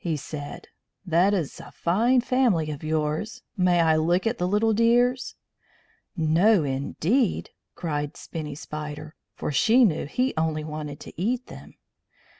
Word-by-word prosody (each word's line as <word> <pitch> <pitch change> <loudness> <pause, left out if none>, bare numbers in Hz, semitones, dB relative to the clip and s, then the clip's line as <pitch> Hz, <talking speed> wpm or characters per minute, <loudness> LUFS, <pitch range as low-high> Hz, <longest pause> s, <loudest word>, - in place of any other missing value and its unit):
he 165 -3 -1
said. 145 0 -7 0.4
"That 175 +3 +3
is 175 -8 -2
a - - -11
fine 235 +9 +2
family 235 -12 +1
of 145 - -7
yours. 155 +6 -2
May 180 -2 +3
I 160 -1 +4
look 175 +5 +1
at 230 +1 -1
the 180 - +1
little 210 +3 +2
dears?" 245 +3 +2 0.8
"No, 170 +4 +4
indeed!" 155 - 0 0.2
cried 150 -4 -3
Spinny 150 -4 -6
Spider, 150 0 -7 0.2
for - - -3
she 230 - +5
knew 160 -7 0
he 255 - 0
only 160 -1 -1
wanted 150 -1 -6
to - - -9
eat 245 +5 0
them. - - -12
170 Hz, 145 wpm, -25 LUFS, 155-220 Hz, 0.8 s, she